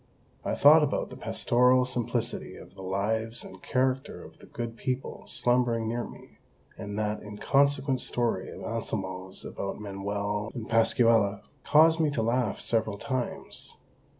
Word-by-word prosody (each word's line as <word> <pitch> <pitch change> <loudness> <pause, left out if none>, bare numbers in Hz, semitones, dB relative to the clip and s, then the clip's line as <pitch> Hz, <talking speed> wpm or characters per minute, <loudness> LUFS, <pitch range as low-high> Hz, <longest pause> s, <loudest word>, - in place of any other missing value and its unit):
I - - -1
thought 155 +3 +8
about 150 - -1
the - - -7
pastoral 125 +1 +3
simplicity 125 -2 -2
of - - -13
the - - -11
lives 110 +5 -1
and 95 -1 -12
character 130 +1 -1
of - - -14
the - - -15
good 115 -1 -5
people 130 +2 -4
slumbering 120 -2 +1
near 120 +2 -1
me; - - -12 0.4
and 100 0 -6
that 105 0 -1
inconsequent 135 +5 +1
story 115 -6 -1
of - - -9
Anselmo's 95 -4 -4
about 100 +1 -5
Manuel 100 +1 -3
and 115 -3 -5
Pascuala 115 -3 +3 0.2
caused 160 +2 +5
me 155 -2 +3
to 125 -6 -1
laugh 120 -1 0
several 110 -3 0
times. 130 +2 -4
115 Hz, 145 wpm, -28 LUFS, 105-130 Hz, 0.4 s, thought